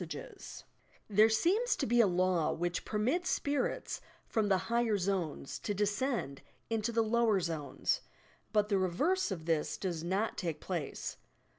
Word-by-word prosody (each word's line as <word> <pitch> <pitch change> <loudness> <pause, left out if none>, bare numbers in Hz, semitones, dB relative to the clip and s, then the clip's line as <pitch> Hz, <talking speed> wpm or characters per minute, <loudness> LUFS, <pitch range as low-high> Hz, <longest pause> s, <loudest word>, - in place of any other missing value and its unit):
THE - - -7
SPIRIT - - -5
WORLD 455 -5 -15 0.7
53 - - -7
There 215 +2 +8
aeema 370 - +2
to - - 0
be 240 +1 +4
a 220 - +5
law 180 -2 +2
which 175 +1 -2
permits 255 +12 0
"spirits" 285 - -1 0.2
from 220 -2 0
the 195 -2 +4
higher 225 +3 +1
zodcs 180 -7 -2
to 205 - -2
descend 205 - -1 0.3
into 225 +1 0
the 230 0 +2
lower 220 -2 +3
zones, 160 -5 -1 0.5
but 210 -1 +2
the 200 -2 +3
reverse 290 - +1
of 170 -5 -5
this 165 -2 0
does 170 -4 -3
not 195 +6 -1
take 165 -4 -2
place. 170 -7 -4
205 Hz, 165 wpm, -33 LUFS, 175-235 Hz, 0.7 s, There